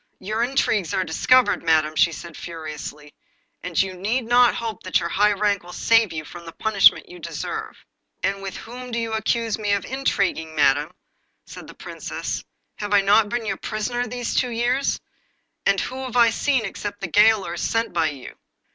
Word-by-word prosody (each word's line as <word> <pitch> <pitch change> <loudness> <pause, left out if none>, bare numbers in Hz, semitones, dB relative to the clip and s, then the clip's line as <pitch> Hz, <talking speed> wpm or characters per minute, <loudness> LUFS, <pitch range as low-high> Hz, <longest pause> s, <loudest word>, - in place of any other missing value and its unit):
'Your 215 +4 -3
intrigues 230 - +1
are 190 - +1
discovered, 230 +6 +3
Madam,' 155 -2 +2
she 170 - +4
said 170 0 -9
furiously; 150 -3 -8 0.5
'and 170 -3 -2
you 190 -1 +1
need 210 +8 -1
not 245 +1 +4
hope 225 -2 -4
that 185 - +1
your 170 -1 -3
high 210 +3 +3
rank 205 0 +1
will 175 - -12
save 230 -2 +3
you 155 -1 -5
from 175 +2 -10
the 165 - -9
punishment 215 -3 +4
you 180 - -12
deserve.' - - -5 0.5
'And 195 0 0
with 195 -1 -6
whom 250 +2 -9
do 235 - -3
you 230 -1 -2
accuse 220 0 0
me 205 -1 0
of 200 - -1
intriguing, 200 -11 -1
Madam?' 145 0 +3 0.6
said - - -11
the - - -12
Princess. - - -5 0.3
'Have 205 0 -3
I 200 - +6
not 205 +2 +4
been 240 0 -2
your 220 - -2
prisoner 240 +3 -3
these 245 +1 -4
two 250 - +1
years, 245 +4 0 0.7
and 195 -1 +3
who 260 +6 -4
have 250 -2 -7
I 235 -1 +6
seen 260 -1 +1
except 205 +1 -6
the 195 - -2
gaolers 205 -2 +3
sent 225 -3 -1
by 165 -2 +2
you? 140 -4 -10
205 Hz, 185 wpm, -23 LUFS, 175-230 Hz, 0.7 s, I